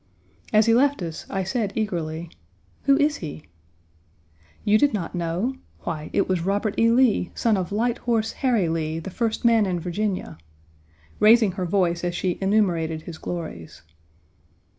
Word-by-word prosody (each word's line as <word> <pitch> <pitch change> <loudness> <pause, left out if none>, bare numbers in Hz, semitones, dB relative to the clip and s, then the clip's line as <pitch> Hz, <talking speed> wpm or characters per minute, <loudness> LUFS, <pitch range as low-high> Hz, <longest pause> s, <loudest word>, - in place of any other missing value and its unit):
As 215 0 +5
he 230 - +4
left 275 -3 +3
us, 165 -2 -6
I 195 -1 -1
said 200 +1 -2
eagerly, 170 -6 -3 0.5
"Who 275 0 +5
is 295 0 +2
he?" 155 -2 -7 1.2
"You 215 0 +4
did 285 -5 +3
not 175 -5 -4
know! 180 +9 -2 0.2
Why, 155 -3 -4
it 195 - +1
was 185 -2 0
Robert 200 +2 0
E. 230 0 +5
Lee, 235 -6 +3
son 225 -2 +2
of 185 -1 -2
Light 235 +4 0
Horse 225 -2 0
Harry 235 -9 +2
Lee, 160 -1 -2
the 165 +4 -6
first 225 +3 -2
man 225 -3 +4
in 180 -2 -1
Virginia," 180 - -3 0.8
raising 220 -1 +6
her 185 0 -3
voice 175 -2 +1
as 175 0 -1
she 180 0 -1
enumerated 175 -6 +1
his 165 -2 -9
glories. 155 - -7
195 Hz, 160 wpm, -24 LUFS, 170-225 Hz, 1.2 s, raising